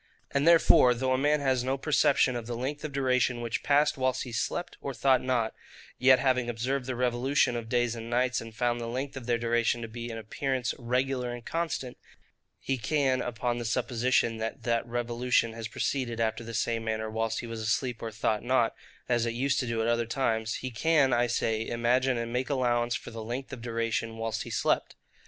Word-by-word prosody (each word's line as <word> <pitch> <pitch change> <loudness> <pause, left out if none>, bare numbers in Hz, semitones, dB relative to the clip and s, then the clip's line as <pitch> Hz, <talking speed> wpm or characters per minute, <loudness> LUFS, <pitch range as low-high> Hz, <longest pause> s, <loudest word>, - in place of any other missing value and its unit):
And 140 +3 +1
therefore, 160 -7 +6
though 130 +2 0
a - - +2
man 150 +1 +2
has 130 -3 +1
no 130 +2 0
perception 135 -2 +3
of 120 -2 -5
the 120 - -3
length 140 +4 -4
of 155 - -4
duration 130 -3 +1
which 115 -2 -2
passed 145 -1 +2
whilst 130 0 +1
he 125 - -8
slept 115 +10 -2
or 140 -2 -4
thought 130 0 +3
not; 120 -3 0 0.5
yet, 130 +1 +7
having 125 -2 +1
observed 125 +3 -2
the 130 - -2
revolution 125 +1 +1
of 115 -1 -5
days 120 -1 +1
and 115 0 -7
nights, 125 +1 +1
and 115 -1 -10
found 120 0 0
the 115 - -4
length 130 +4 -4
of 130 -3 -7
their 120 -1 +2
duration 120 0 +1
to - - -4
be 120 +1 -6
in 115 - -5
appearance 125 +3 -2
regular 125 +1 -1
and 120 -1 -8
constant, 150 -7 -3 0.6
he 135 -1 -2
can, 135 +1 +1
upon 120 0 -2
the - - -3
supposition 120 0 +1
that 110 0 -4
that 115 0 0
revolution 120 0 0
has 115 -1 -5
proceeded 120 -3 -2
after 110 0 0
the 115 0 -7
same 115 0 0
manner 110 0 -2
whilst 110 +1 -2
he - - -7
was 115 -1 -6
asleep 115 +2 -1
or 115 - -3
thought 110 -1 -1
not, 120 -2 +2 0.3
as 120 -2 +1
it 115 - -2
used 135 +3 +1
to 125 - -2
do 115 -1 -1
at - - 0
other 120 0 +1
times, 115 -3 0
he 130 - -3
can, 140 +2 +3
I 120 0 +3
say, 115 -2 -1
imagine 125 +2 +1
and 115 0 -3
make 125 +1 -1
allowance 120 -3 +1
for - - -6
the 115 -1 -6
length 125 +5 -5
of 125 - -7
duration 115 -1 -2
whilst 115 0 -2
he - - -6
slept. - - 0
120 Hz, 210 wpm, -29 LUFS, 115-130 Hz, 0.6 s, yet